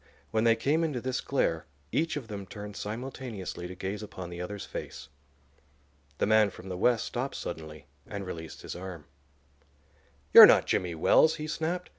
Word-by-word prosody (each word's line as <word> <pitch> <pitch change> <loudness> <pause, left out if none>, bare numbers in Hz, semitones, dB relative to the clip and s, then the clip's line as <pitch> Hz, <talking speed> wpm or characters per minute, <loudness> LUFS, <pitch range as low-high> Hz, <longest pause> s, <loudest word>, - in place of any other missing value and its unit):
When 110 +1 +1
they 115 -1 +5
came 155 +7 +1
into 150 -6 -1
this 130 +1 -2
glare 90 -11 -1 0.2
each 165 -1 0
of 130 -6 -6
them 100 -3 -7
turned 105 +1 -8
simultaneously 110 -5 -6
to 90 - -8
gaze 95 +3 -4
upon 95 -4 -8
the 85 0 -6
other's 100 +3 -5
face. - - -8 1.1
The - - +1
man 110 -1 +4
from 95 0 -11
the 90 - -4
West 120 +4 +2
stopped 130 +3 -3
suddenly 80 -3 -7 0.2
and 100 -2 -5
released 80 -3 -8
his - - -6
arm. 90 -4 -8 1.3
"You're - - +13
not - - +5
Jimmy 90 -2 -1
Wells," 160 - +4
he 155 -1 -5
snapped. 165 +3 -3
105 Hz, 170 wpm, -29 LUFS, 90-130 Hz, 1.3 s, You're